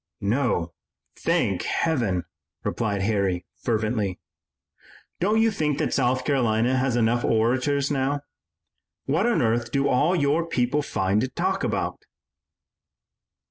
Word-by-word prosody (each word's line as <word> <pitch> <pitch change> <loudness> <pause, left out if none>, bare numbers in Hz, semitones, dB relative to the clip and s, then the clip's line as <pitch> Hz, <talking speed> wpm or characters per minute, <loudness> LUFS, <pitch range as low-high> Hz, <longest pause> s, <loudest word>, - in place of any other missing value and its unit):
"No, 100 - 0 0.4
thank - - 0
Heaven," 115 - 0 0.4
replied 100 -4 -1
Harry 100 -4 0 0.2
fervently. 110 -4 -1 1.0
"Don't 210 +5 +2
you 225 0 +4
think 150 -7 -1
that - - -1
South 130 0 +1
Carolina 125 -3 +2
has 130 -1 +1
enough 120 +1 +2
orators 130 +5 +1
now? 140 +1 0 0.8
What 160 - +1
on 240 - +2
earth 115 +1 0
do 140 0 +1
all 150 +8 +3
your 150 +1 +2
people 135 -1 +1
find 100 -5 0
to 130 - 0
talk 190 +8 -1
about?" - - -2
125 Hz, 120 wpm, -25 LUFS, 110-145 Hz, 1.0 s, you